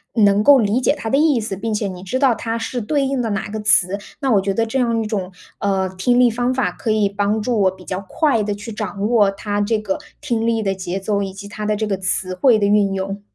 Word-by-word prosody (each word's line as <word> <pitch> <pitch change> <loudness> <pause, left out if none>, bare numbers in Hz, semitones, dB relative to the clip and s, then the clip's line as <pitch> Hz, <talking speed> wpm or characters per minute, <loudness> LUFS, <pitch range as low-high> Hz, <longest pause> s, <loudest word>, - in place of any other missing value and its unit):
能 205 -2 +4
够 285 +2 +7
理 220 +3 +1
解 285 - +2
它 - - -6
的 270 +5 +2
意 300 -5 +3
思， 210 -3 -4
并 225 +4 -4
且 210 -1 -1
你 185 -1 -7
知 190 +7 -3
道 265 -3 +4
它 225 +1 -3
是 235 +1 -3
对 280 +5 0
应 265 -1 -1
的 230 - -2
哪 200 -1 -2
个 215 - -4
词， 205 -2 +3 0.2
那 270 -3 0
我 200 -3 +4
觉 195 - -1
得 230 - +1
这 245 +4 -2
样 235 -2 +1
一 - - -5
种， 195 -4 -3 0.3
呃， 195 -1 0
听 190 +7 +1
力 245 -2 +5
方 245 +2 0
法 245 -9 0
可 200 - -5
以 215 -2 +2
帮 205 +2 -1
助 220 -1 0
我 190 - +4
比 185 -1 -15
较 190 +1 -4
快 285 -9 +1
地 205 0 -2
去 210 +3 -8
掌 210 -1 -3
握 215 -4 +4
它 205 +1 -3
这 220 +2 +1
个 290 +8 -3 0.2
听 235 -6 -1
力 225 -1 +1
的 195 -1 0
节 185 0 -4
奏， 200 +1 -1
以 195 -1 -3
及 200 +1 -9
它 210 0 -5
的 215 - +1
这 215 +1 -2
个 195 -2 -1
词 185 0 -1
汇 225 +5 +4
的 205 - +1
运 200 -1 +3
用。 195 +1 -4
210 Hz, 290 characters per minute, -19 LUFS, 195-230 Hz, 0.3 s, 够